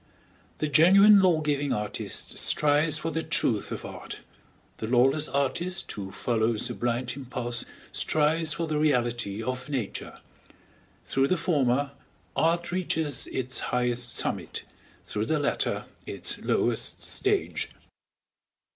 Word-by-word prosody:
The 155 Hz, -, -1 dB
genuine 195 Hz, +8 st, +7 dB
law 180 Hz, -5 st, +4 dB
giving 145 Hz, -2 st, 0 dB
artist 105 Hz, -1 st, -3 dB
strives 150 Hz, +1 st, +3 dB
for 165 Hz, +1 st, -3 dB
the 160 Hz, -, -1 dB
truth 155 Hz, -, 0 dB
of -, -, -5 dB
art, -, -, -8 dB, 0.6 s
the 110 Hz, -, -4 dB
lawless 135 Hz, +5 st, +3 dB
artist 140 Hz, +7 st, -1 dB
who 95 Hz, -2 st, -6 dB
follows 110 Hz, -1 st, 0 dB
a -, -, -3 dB
blind 120 Hz, +1 st, -1 dB
impulse 120 Hz, -3 st, -2 dB, 0.3 s
strives 155 Hz, +1 st, +2 dB
for 170 Hz, -, -2 dB
the 155 Hz, -2 st, -1 dB
reality 120 Hz, -7 st, 0 dB
of 130 Hz, +4 st, -4 dB
Nature; 125 Hz, -8 st, -4 dB, 0.9 s
through 135 Hz, 0 st, +2 dB
the 185 Hz, -, +1 dB
former, 140 Hz, -5 st, +1 dB, 0.4 s
art 170 Hz, +1 st, +1 dB
reaches 160 Hz, -6 st, -1 dB
its 130 Hz, 0 st, -2 dB
highest 120 Hz, -1 st, -1 dB
summit, -, -, -2 dB, 0.4 s
through 105 Hz, +1 st, -3 dB
the 155 Hz, -, +2 dB
latter 145 Hz, -, 0 dB, 0.2 s
its -, -, -2 dB
lowest -, -, 0 dB
stage. 400 Hz, 0 st, -1 dB
140 Hz, 125 wpm, -27 LUFS, 120-160 Hz, 0.9 s, genuine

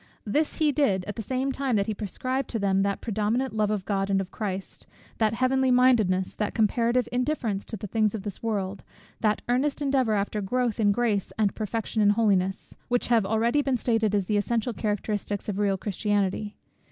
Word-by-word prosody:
This 295 Hz, +9 st, 0 dB
he 310 Hz, -2 st, +3 dB
did, 205 Hz, -11 st, +1 dB
at 205 Hz, -, -5 dB
the 225 Hz, -, -4 dB
same 260 Hz, +5 st, -1 dB
time 270 Hz, -3 st, -1 dB
that 200 Hz, -1 st, +2 dB
he 215 Hz, -, -2 dB
prescribed 255 Hz, +6 st, -3 dB
to 230 Hz, -, -2 dB
them 195 Hz, -2 st, +2 dB
that 200 Hz, 0 st, -1 dB
predominant 225 Hz, +4 st, -1 dB
love 215 Hz, -1 st, +1 dB
of 205 Hz, -3 st, -2 dB
God 195 Hz, -1 st, -1 dB
and 195 Hz, -1 st, +2 dB
of 190 Hz, -1 st, -4 dB
Christ, 195 Hz, -3 st, -5 dB, 0.3 s
that 220 Hz, 0 st, +2 dB
heavenly 260 Hz, +2 st, +2 dB
mindedness, 230 Hz, -8 st, +3 dB
that 210 Hz, -, -3 dB
comparative 235 Hz, +3 st, +2 dB
indifference 245 Hz, -5 st, -1 dB
to 220 Hz, -, -6 dB
the 205 Hz, -, -7 dB
things 215 Hz, +1 st, +1 dB
of 205 Hz, -, -5 dB
this 205 Hz, -3 st, -6 dB
world, 200 Hz, -3 st, -2 dB, 0.4 s
that 215 Hz, -2 st, +1 dB
earnest 265 Hz, +5 st, +1 dB
endeavour 270 Hz, -5 st, +1 dB
after 205 Hz, +1 st, -1 dB
growth 240 Hz, +3 st, -1 dB
in 205 Hz, -2 st, +4 dB
grace 215 Hz, -3 st, 0 dB
and 210 Hz, -2 st, +2 dB
perfection 220 Hz, 0 st, -2 dB
in 205 Hz, -, +5 dB
holiness, 200 Hz, -3 st, +1 dB
which 245 Hz, 0 st, 0 dB
have 225 Hz, -5 st, +3 dB
already 230 Hz, +6 st, +2 dB
been 270 Hz, -3 st, 0 dB
stated 225 Hz, -3 st, +1 dB
as 200 Hz, -2 st, +1 dB
the 210 Hz, +2 st, +1 dB
essential 230 Hz, +3 st, 0 dB
characteristics 205 Hz, -1 st, -2 dB
of 205 Hz, -1 st, -2 dB
real 200 Hz, -2 st, +2 dB
Christianity. 205 Hz, 0 st, -1 dB
215 Hz, 195 wpm, -26 LUFS, 200-245 Hz, 0.4 s, in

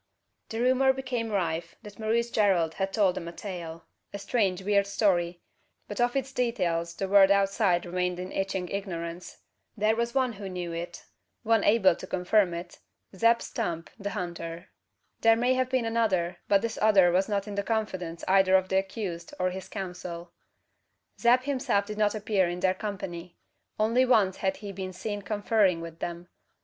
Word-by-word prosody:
The 225 Hz, -, -4 dB
rumour 260 Hz, +2 st, +4 dB
became 255 Hz, -4 st, -3 dB
rife 170 Hz, -4 st, -2 dB
that 210 Hz, -1 st, -12 dB
Maurice 230 Hz, +2 st, 0 dB
Gerald 185 Hz, -7 st, +2 dB
had 195 Hz, +2 st, -2 dB
told 195 Hz, -3 st, +3 dB
them 170 Hz, -, -6 dB
a -, -, -5 dB
tale 170 Hz, -3 st, -7 dB, 0.3 s
a -, -, -5 dB
strange 195 Hz, -3 st, 0 dB
weird 200 Hz, 0 st, +2 dB
story 175 Hz, -4 st, +1 dB, 0.5 s
but -, -, -3 dB
of 245 Hz, +1 st, +2 dB
its 270 Hz, -1 st, -1 dB
details 175 Hz, -10 st, -1 dB
the 195 Hz, -, -2 dB
world 195 Hz, 0 st, +6 dB
outside 195 Hz, -2 st, +2 dB
remained 180 Hz, 0 st, -1 dB
in 185 Hz, +1 st, -6 dB
itching 195 Hz, -2 st, -2 dB
ignorance. 175 Hz, -3 st, -5 dB, 0.4 s
There 215 Hz, +1 st, +2 dB
was 235 Hz, +2 st, -2 dB
one 260 Hz, -3 st, +2 dB
who 200 Hz, -2 st, -7 dB
knew 180 Hz, -2 st, -4 dB
it 170 Hz, +1 st, -6 dB, 0.4 s
one 225 Hz, -2 st, +3 dB
able 195 Hz, -5 st, +4 dB
to 185 Hz, -, -9 dB
confirm 185 Hz, 0 st, +2 dB
it 175 Hz, +1 st, -8 dB, 0.4 s
Zeb 230 Hz, +4 st, +3 dB
Stump 165 Hz, -1 st, -4 dB
the 200 Hz, 0 st, -3 dB
hunter. 170 Hz, -1 st, -6 dB, 0.5 s
There 225 Hz, 0 st, +5 dB
may 245 Hz, +3 st, +2 dB
have 255 Hz, 0 st, 0 dB
been 255 Hz, -2 st, +1 dB
another; 200 Hz, -7 st, 0 dB
but 200 Hz, -1 st, +3 dB
this 230 Hz, -1 st, -3 dB
other 200 Hz, -5 st, +5 dB
was 190 Hz, +3 st, +1 dB
not 200 Hz, 0 st, -1 dB
in 205 Hz, -, -5 dB
the 200 Hz, -, -1 dB
confidence 190 Hz, -6 st, -3 dB
either 190 Hz, 0 st, +5 dB
of 185 Hz, 0 st, +2 dB
the 190 Hz, -, +3 dB
accused 190 Hz, -4 st, -5 dB
or 185 Hz, 0 st, +1 dB
his 190 Hz, +1 st, -7 dB
counsel. 180 Hz, -3 st, -6 dB, 0.9 s
Zeb 245 Hz, +1 st, +5 dB
himself 255 Hz, -7 st, 0 dB
did 210 Hz, 0 st, -6 dB
not 210 Hz, 0 st, +2 dB
appear 205 Hz, -4 st, +1 dB
in 175 Hz, +1 st, -5 dB
their 185 Hz, -1 st, +3 dB
company. 185 Hz, -4 st, -6 dB, 0.4 s
Only 230 Hz, +4 st, +3 dB
once 215 Hz, -7 st, +3 dB
had 190 Hz, -1 st, -1 dB
he 200 Hz, -, -4 dB
been 185 Hz, -1 st, -6 dB
seen 205 Hz, +3 st, -4 dB
conferring 205 Hz, -3 st, +1 dB
with 165 Hz, 0 st, -8 dB
them. 175 Hz, +1 st, -5 dB
195 Hz, 180 wpm, -28 LUFS, 180-220 Hz, 0.9 s, world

